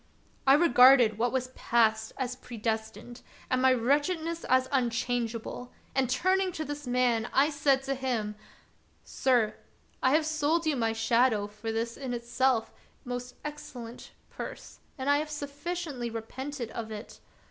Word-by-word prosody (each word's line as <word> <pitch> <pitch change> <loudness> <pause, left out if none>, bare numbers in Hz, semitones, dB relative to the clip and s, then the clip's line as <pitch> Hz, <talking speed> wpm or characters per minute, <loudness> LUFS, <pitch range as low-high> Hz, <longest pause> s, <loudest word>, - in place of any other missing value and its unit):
I 270 - +8
regarded 250 -7 +6
what 240 +1 +2
was 255 -1 -1
past 220 -3 +1
as 250 -2 -2
predestined, 225 -1 -5 0.3
and 255 0 +2
my 260 0 +5
wretchedness 305 +7 0
as 260 0 +3
unchangeable, 245 -1 -1 0.2
and, 265 -2 +1
turning 370 +8 +2
to 315 - -4
the 290 -2 -6
man, 245 -2 +2
I 285 +3 +3
said 280 -2 +2
to 275 0 -1
him: 245 -6 -2 0.4
— - - -37 0.2
"Sir, 240 -5 +1 0.4
I 260 - +3
have 315 0 +2
sold 315 +2 +1
you 310 -2 +2
my 225 -3 0
shadow 225 -1 +2
for 215 +2 -6
this 230 +1 -2
in 260 -3 -4
itself 240 0 0 0.3
most 245 0 -5
excellent 250 -5 -8 0.2
purse, - - -8 0.2
and 265 0 -4
I 285 0 +4
have 305 0 -4
sufficiently 290 -2 -4
repented 235 +2 -6
of 225 -1 -5
it. 215 0 -8
255 Hz, 145 wpm, -29 LUFS, 230-285 Hz, 0.4 s, I